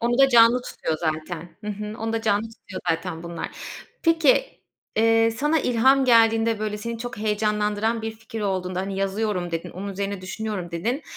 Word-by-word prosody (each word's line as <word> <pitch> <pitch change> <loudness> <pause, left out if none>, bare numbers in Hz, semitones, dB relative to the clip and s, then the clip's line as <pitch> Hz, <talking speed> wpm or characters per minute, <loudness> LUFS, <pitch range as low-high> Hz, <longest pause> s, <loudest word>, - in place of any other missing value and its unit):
Onu 240 +2 +1
da 270 - +7
canlı 240 0 +6
tutuyor 160 - -3
zaten. 160 +1 -3 0.2
Hı - - -6
hı, 210 +1 -6
onu 225 0 -2
da 225 0 -1
canlı 205 -1 +2
tutuyor 190 -4 -9
zaten, 165 0 -3
bunlar. 170 0 -5 0.5
Peki, 330 - +3 0.4
eee, 225 0 +4
sana 295 +7 +1
ilham 260 +3 +4
geldiğinde, 225 -2 +4
böyle, 215 -1 -3
seni 230 +2 -5
çok 245 +1 -6
heyecanlandıran 210 +1 0
bir 225 - -2
fikir 220 +1 -8
olduğunda. 185 -2 -1
Hani, 195 0 -4
yazıyorum 195 -2 -1
dedin. 165 -1 -4
Onun 195 +3 -6
üzerine 200 0 -3
düşünüyorum, 195 -2 -4
dedin. 235 - -2
215 Hz, 170 wpm, -24 LUFS, 190-230 Hz, 0.5 s, da